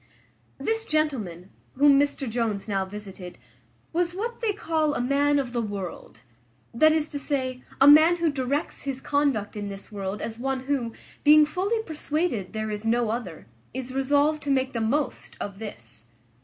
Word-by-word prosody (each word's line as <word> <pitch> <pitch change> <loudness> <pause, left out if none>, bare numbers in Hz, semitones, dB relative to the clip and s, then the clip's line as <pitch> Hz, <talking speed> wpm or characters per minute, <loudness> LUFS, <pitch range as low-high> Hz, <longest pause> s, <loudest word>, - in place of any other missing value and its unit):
This 450 0 -1
gentleman, 220 - -1 0.2
whom 280 +1 +6
Mr 285 -1 0
Jones 225 -3 -2
now 195 -2 0
visited, 190 -2 -8 0.6
was 350 +1 0
what 470 +5 -4
they 450 -3 +2
call 320 -6 0
a - - -1
man 280 +3 +2
of 260 -3 -2
the 240 - 0
world; 200 -5 -6 0.5
that 310 +7 +5
is 310 -1 +1
to 290 - -3
say, 260 -3 -2 0.2
a 275 - +7
man 310 +4 +8
who 335 -2 +1
directs 280 +2 -2
his 275 -2 -3
conduct 270 -8 0
in 205 -1 -4
this 195 +2 -8
world 200 0 -4
as 225 0 -5
one 265 +1 -1
who, 260 -4 -2 0.3
being 300 +1 +8
fully 395 +8 -1
persuaded 305 - -2
there 215 -1 -3
is 210 0 -4
no 230 0 +1
other, 215 - -5 0.3
is 260 0 -4
resolved 285 +3 +2
to 290 - -5
make 265 -1 +1
the 230 - -1
most 260 +4 -1
of 200 -1 -5
this. 120 - -9
265 Hz, 170 wpm, -26 LUFS, 215-300 Hz, 0.6 s, man